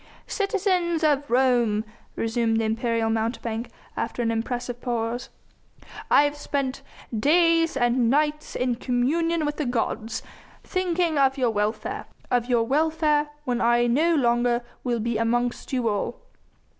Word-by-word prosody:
"Citizens 370 -5 0
of 290 -2 +2
Rome," 240 -4 +2 0.3
resumed 225 0 0
the - - 0
imperial 225 0 0
mountebank 225 +1 -2 0.3
after 240 - -2
an 230 - +1
impressive 240 +1 -3
pause, 240 +1 -2 0.8
"I - - +6
have 290 0 0
spent 275 -2 -3 0.3
days 330 +5 +3
and 240 -1 +2
nights 300 +2 0
in 250 -2 0
communion 305 +7 0
with 295 0 -2
the 300 - -1
gods, 230 -1 -2 0.4
thinking 350 -4 0
of 270 0 +3
your 250 -3 +2
welfare 220 - -2 0.2
of 245 -1 +1
your 240 -2 +3
welfare 300 +2 +1 0.2
when 245 -1 -1
I 240 +1 +3
no 310 +8 +3
longer 240 -2 +2 0.2
will 240 -2 0
be 225 0 -1
amongst 240 +1 -1
you 250 -3 0
all. 205 -2 -2
245 Hz, 135 wpm, -25 LUFS, 230-300 Hz, 0.8 s, I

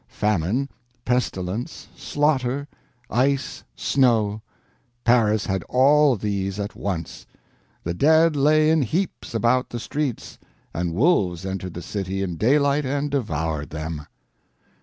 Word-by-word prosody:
Famine, 105 +6 0 0.4
pestilence, 120 - -2
slaughter, 140 -2 0 0.4
ice, 135 +3 0
snow—Paris 115 -1 0
had 95 -1 -1
all 140 +2 +5
these 100 -1 -2
at 100 0 -4
once. 90 -5 -5 0.6
The 85 - -2
dead 160 - +4
lay 155 +2 +4
in 160 -1 +3
heaps 155 - -2
about 120 +3 +2
the 120 - -5
streets, 140 +1 -4 0.3
and 85 0 -2
wolves 95 - +2
entered 95 -2 -5
the 85 - -6
city 95 +1 -3
in 90 -3 -4
daylight 140 - +3
and 140 +2 -2
devoured 80 - -2
them. 80 -1 -5
115 Hz, 115 wpm, -23 LUFS, 95-140 Hz, 0.6 s, all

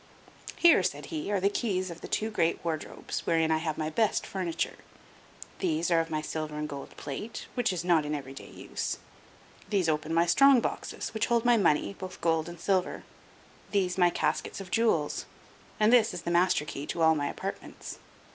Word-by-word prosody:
"Here," 340 - +6
said 145 -5 -2
he, 155 +6 -3
"are 200 - +2
the 195 - +2
keys 190 -3 -1
of 170 - -10
the - - -7
two 220 +1 -1
great 170 -5 0
wardrobes, 160 -2 -4
wherein 165 -1 +3
I 160 - +3
have 160 -2 -2
my 155 0 -2
best 220 +5 +1
furniture; 180 -4 -2 0.8
these 170 -1 0
are 165 - +5
of 165 0 -1
my 155 -1 -2
silver 155 -1 -4
and 150 0 -2
gold 140 -2 -8
plate, 150 +11 -6
which 245 -5 +1
is 175 -2 -3
not 170 -3 +3
every 145 -3 -4
day - - -10
in - - -14
use; - - -3 0.7
these 195 -5 +1
open 155 0 0
my 165 +1 +4
strong 270 +9 +6
boxes, - - -4
which 220 0 0
hold 235 0 +2
my 240 0 +6
money, 180 -4 +2
both 185 -1 -8
gold 165 0 +1
and 170 -1 -10
silver; 185 +1 0 0.7
these 185 -3 +1
my 180 -2 +5
caskets - - -1
of 190 -2 -9
jewels; 195 -10 +1 0.5
and 215 +2 +5
this 225 -6 +5
is 175 - -6
the 170 - -2
master 175 -3 +3
key 145 -1 -6
to 165 - -1
all 160 0 +6
my 145 -2 -1
apartments. - - -7
170 Hz, 195 wpm, -29 LUFS, 155-200 Hz, 0.8 s, Here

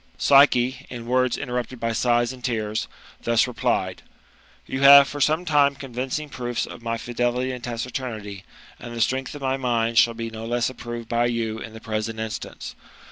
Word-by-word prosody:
Psyche, 135 -2 +4
in 120 -2 -7
words 125 +1 +1
interrupted 125 -2 -4
by 115 0 -1
sighs 120 +1 +1
and 125 -1 -13
tears, 110 -3 -2 0.3
thus 115 -1 +3
replied: 125 -2 -1 0.3
" - - -30
You 130 - -4
have 140 0 +9
for 145 - -6
some 155 +5 +2
time 145 -3 +4
had - - -21
convincing 135 +3 -4
proofs 120 -4 -3
of - - -10
my 115 0 -2
fidelity 120 +2 -1
and 125 -2 -7
taciturnity; 115 -5 -5 0.4
and 120 -1 -8
the 115 - -3
strength 130 +4 0
of 145 - -8
my 135 0 0
mind 115 -3 +1
shall 115 -1 +4
be 115 0 -5
no 110 0 -7
less 120 +1 0
approved 120 -2 -7
by 120 +1 +1
you 115 -2 -2
in 115 - -8
the 110 - -9
present 110 0 -3
instance. 110 -1 -6
120 Hz, 190 wpm, -24 LUFS, 115-130 Hz, 0.4 s, have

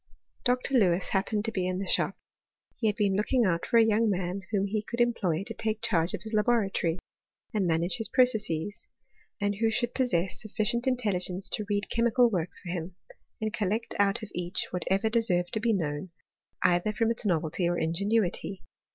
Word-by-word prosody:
Dr. 250 +2 +1
Lewis 180 -3 +2
happened 205 +2 0
to 225 - +1
be 185 -4 -1
in 185 0 -1
the 195 - -3
shop: - - +1 0.6
he 225 - 0
had 210 - +1
been 205 -3 +1
looking 230 +4 +2
out 170 -3 0
for 235 - +3
a 225 - +7
young 220 +1 +3
man 185 0 -2
whom 200 -2 +1
he 210 +1 -1
could 235 +3 -6
employ 195 -8 +1
to - - -5
take 220 -1 -2
charge 180 -7 +1
of - - -9
his 220 0 -8
laboratory, 210 -6 +1 0.6
and 200 -4 +1
manage 170 +4 +1
his 225 - 0
processes, 215 - +1 0.5
and 205 -1 -1
who 225 +1 +2
should 240 +2 0
possess 190 -9 0
sufficient 220 +3 0
intel 250 -6 +1
ligence 180 +1 -3
to 210 - -1
read 205 0 0
chemical 235 +1 +3
works 175 -3 -2
for 175 - -9
him, 175 0 -4 0.4
and 215 -1 -2
collect 215 +3 -1
out 200 +3 +2
of 210 - -8
each 180 +1 -2
whatever 190 +4 0
deserved 205 -6 +1
to 220 - +3
be 230 +2 +1
known, 160 -3 -2 0.5
either 180 +3 +3
from 225 +1 +1
its 230 - -2
novelty 170 -2 0
or 175 - 0
ingenuity. 195 +3 -1
205 Hz, 190 wpm, -28 LUFS, 180-225 Hz, 0.6 s, a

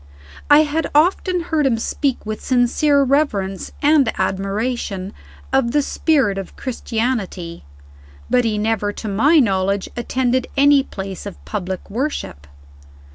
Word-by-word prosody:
I 290 +1 +8
had 305 +1 -2
often 360 +3 +2
heard 315 -4 0
him 235 -3 +1
speak 265 +3 -2
with 215 0 -5
sincere 275 +3 +3
reverence 220 -9 0
and 285 -5 +4
admiration 195 +1 -2 0.4
of 265 -3 +2
the 295 -1 +3
spirit 270 -11 +1
of 195 - -8
Christianity 220 - -3 0.6
but 250 0 +2
he 220 -2 0
never, 210 -1 0
to 220 - -7
my 265 +11 +3
knowledge, 195 -6 +1
attended 255 +1 0
any 285 0 +6
place 195 -5 -7
of 200 - -11
public 190 -3 -4
worship. 215 - -4
240 Hz, 130 wpm, -19 LUFS, 195-280 Hz, 0.6 s, I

